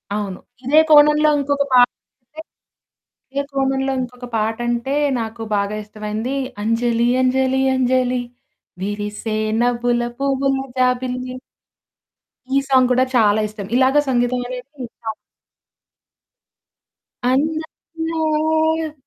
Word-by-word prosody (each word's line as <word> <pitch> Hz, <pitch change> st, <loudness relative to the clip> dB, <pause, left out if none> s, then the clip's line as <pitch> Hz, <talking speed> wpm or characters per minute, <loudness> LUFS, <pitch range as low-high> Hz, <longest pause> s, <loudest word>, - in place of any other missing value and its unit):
అవును. 200 Hz, -3 st, -4 dB, 0.3 s
ఇదే 295 Hz, +4 st, +5 dB
కోణంలో 300 Hz, 0 st, +6 dB
ఇంకొక 285 Hz, 0 st, 0 dB
పాటంటే, 250 Hz, +3 st, -1 dB, 0.9 s
ఇదే 280 Hz, +1 st, -1 dB
కోణంలో 270 Hz, 0 st, 0 dB
ఇంకొక 250 Hz, 0 st, -6 dB
పాటంటే 235 Hz, +4 st, -1 dB, 0.3 s
నాకు 225 Hz, 0 st, -5 dB
బాగా 200 Hz, +1 st, -1 dB
ఇష్టమైంది, 215 Hz, +5 st, -4 dB, 0.3 s
అంజలి 230 Hz, +1 st, +1 dB
అంజలి 260 Hz, +1 st, +2 dB
అంజలి 255 Hz, -1 st, +1 dB, 0.6 s
విరిసే 210 Hz, +2 st, -3 dB, 0.2 s
నవ్వుల 240 Hz, 0 st, +1 dB, 0.2 s
పువ్వుల 275 Hz, 0 st, +1 dB, 0.2 s
జాబిల్లి. 255 Hz, 0 st, -1 dB, 1.2 s
ఈ -, -, +5 dB
సాంగ్ 260 Hz, -2 st, +5 dB
కూడా 255 Hz, +1 st, +4 dB
చాలా 215 Hz, -3 st, +4 dB
ఇష్టం. 210 Hz, -1 st, -8 dB
ఇలాగ 265 Hz, +3 st, +4 dB
సంగీతం 245 Hz, 0 st, +1 dB
అనేది 250 Hz, 0 st, -7 dB, 0.2 s
ఇష్టం. 225 Hz, -1 st, -7 dB, 2.2 s
అందాల 315 Hz, +1 st, -1 dB
255 Hz, 90 wpm, -20 LUFS, 235-275 Hz, 2.2 s, కోణంలో